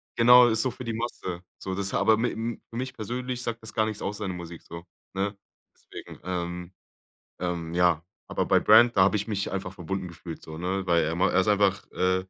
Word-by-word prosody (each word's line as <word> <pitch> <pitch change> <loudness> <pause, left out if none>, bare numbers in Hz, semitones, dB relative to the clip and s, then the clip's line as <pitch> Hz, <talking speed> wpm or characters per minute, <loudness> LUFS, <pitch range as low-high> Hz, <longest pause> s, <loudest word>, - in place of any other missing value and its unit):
Genau, 125 +1 +8
ist 110 -1 +3
so 130 - 0
für 130 +1 -9
die 115 -1 -3
Masse, 100 -6 -4 0.2
so. 95 -1 -4
Das 100 0 -2
ha - - +2
aber 110 +2 +5
m 115 0 -2
für - - -10
mich 130 +2 -3
persönlich 125 +3 -4
sagt 115 -1 -3
das 110 - -6
gar 110 -1 +2
nichts 110 -1 -4
aus, 100 +1 -3
seine 100 -4 -3
Musik 85 -1 -9
so, 85 +1 -9 0.3
ne? 100 +1 -2 0.4
Deswegen, - - -11
ähm, 90 0 -4 0.7
ähm, 85 -2 -3
ja 85 -2 +3 0.2
aber - - -1
bei - - +5
Brand, 120 -3 +6
da - - +7
habe 100 +3 +3
ich 105 +2 -1
mich 100 -2 -2
einfach 95 -1 -3
verbunden 95 0 -4
gefühlt 85 -1 -9
so, 80 0 -8
ne? 95 +2 -2
Weil 85 -2 +3
er 80 +1 -2
ma 90 - +2
er 95 - +3
ist 95 - +1
einfach, 100 -1 +2
äh 95 0 +1
95 Hz, 225 wpm, -27 LUFS, 90-110 Hz, 0.7 s, Genau